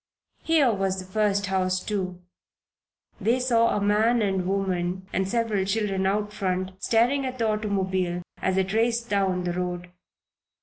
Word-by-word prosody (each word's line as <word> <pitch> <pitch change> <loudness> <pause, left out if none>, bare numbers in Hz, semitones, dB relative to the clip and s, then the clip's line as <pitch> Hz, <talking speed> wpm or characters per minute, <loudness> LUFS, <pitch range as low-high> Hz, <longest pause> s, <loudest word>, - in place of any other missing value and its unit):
Here 300 -7 +3
was 195 -1 -1
the 185 - -5
first 200 +1 +1
house, 185 -1 0
too. 185 -3 -3 1.0
They 230 +5 +2
saw 230 -3 +2
a - - +1
man 215 +3 +3
and 190 -3 0
woman 185 -1 -1
and 190 +1 0
several 225 -3 0
children 195 -1 0
out 210 +1 -1
front, 185 -2 -2
staring 245 +5 +2
at 255 -1 -4
the 230 -2 +1
automobile 190 -4 -1 0.2
as 190 0 0
it 190 +1 0
raced 230 +1 +1
down 190 -3 +1
the 175 -1 -1
road. 180 0 -4
195 Hz, 150 wpm, -25 LUFS, 185-220 Hz, 1.0 s, Here